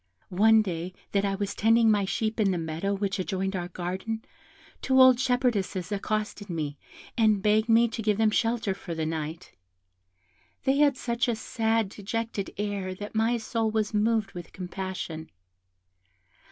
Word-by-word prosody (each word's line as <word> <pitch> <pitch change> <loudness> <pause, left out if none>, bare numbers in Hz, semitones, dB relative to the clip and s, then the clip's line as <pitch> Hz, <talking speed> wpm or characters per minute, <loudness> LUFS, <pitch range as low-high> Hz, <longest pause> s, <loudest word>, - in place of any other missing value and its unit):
One 220 +4 +5
day 180 -1 -4 0.2
that 200 0 +1
I 195 0 0
was 200 0 -3
tending 225 +1 +4
my 205 -2 +2
sheep 220 +3 -2
in 205 -2 +3
the 185 - 0
meadow 165 +5 -2
which 195 0 -2
adjoined 190 +1 -2
our 175 -1 -3
garden, 185 +5 -4 0.6
two 265 0 +3
old 260 -1 +8
shepherdesses 240 -9 0
accosted 210 0 -2
me, 150 -4 -3 0.4
and 215 -3 +3
begged 215 +2 +3
me 230 +1 +6
to 230 0 -5
give 210 -2 +1
them 220 -1 +3
shelter 225 -3 +1
for 175 -3 -7
the 160 -1 -2
night; 160 +1 -4 1.1
they 270 +1 +2
had 285 -2 +4
such 235 0 -1
a 240 - +1
sad 225 -1 0
dejected 215 0 -4
air 200 -2 -3
that 205 +2 -7
my 225 +2 +2
soul 225 0 -1
was 215 0 -1
moved 215 0 +1
with 175 -2 -9
compassion. 180 -3 -5
210 Hz, 160 wpm, -27 LUFS, 185-225 Hz, 1.1 s, old